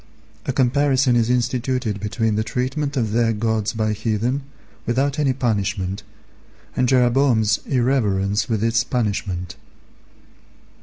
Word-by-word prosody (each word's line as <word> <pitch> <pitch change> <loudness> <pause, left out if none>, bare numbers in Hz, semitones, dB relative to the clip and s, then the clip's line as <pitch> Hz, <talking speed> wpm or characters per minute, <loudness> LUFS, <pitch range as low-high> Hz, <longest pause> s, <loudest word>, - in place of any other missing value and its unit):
A - - +2
comparison 130 0 +2
is 115 -1 +2
instituted 125 -2 0
between 110 +1 -1
the 110 - 0
treatment 135 +5 -2
of 110 -4 0
their 115 0 +2
gods 110 -1 0
by 110 -1 -1
heathen 115 +5 -1 0.5
without 135 +4 0
any 140 -3 +2
punishment, 100 -6 -1 0.7
and 125 -1 +1
Jeroboam's 120 -4 +3
irreverence 110 -7 +1
with 110 -2 0
its 115 0 +2
punishment. 100 -7 -2
115 Hz, 115 wpm, -21 LUFS, 110-130 Hz, 0.7 s, Jeroboam's